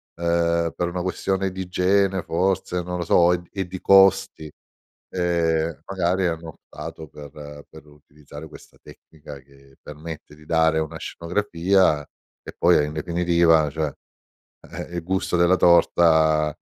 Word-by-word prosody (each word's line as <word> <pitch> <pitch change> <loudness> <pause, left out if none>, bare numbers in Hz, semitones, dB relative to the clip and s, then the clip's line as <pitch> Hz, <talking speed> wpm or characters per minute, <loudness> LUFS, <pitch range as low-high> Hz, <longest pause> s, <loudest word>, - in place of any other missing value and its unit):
ehm, 85 -1 0
per 90 - -2
una 90 0 -4
questione 95 +1 -2
di 95 0 -6
igiene 95 +1 0
forse, 90 +1 -1
non 90 +1 -5
lo 85 - -3
so, 85 +1 +4
e - - 0
d 85 - -18
e 95 -3 -4
di 95 0 -8
costi, 95 -5 +3 0.6
ehm, 85 -2 -1
magari 95 -1 -1
hanno 80 0 -5
optato 80 +1 -10
per 75 0 -12
per 80 -1 -15
utilizzare 75 +1 -14
questa - - -16
tecnica 75 -2 -14
che 70 0 -22
permette 75 0 -10
di 75 0 -19
dare 80 -1 +2
una 80 +1 -4
scenografia 90 -3 0 0.4
e - - -10
poi, - - +4
e - - +2
in 75 - -6
definitiva, 85 -1 +2
cioè, 75 -1 -3 0.8
eh, 85 - -8
il 85 - -4
gusto 95 0 -1
della 85 +1 +4
torta, 80 -3 +3
85 Hz, 150 wpm, -22 LUFS, 80-90 Hz, 0.8 s, so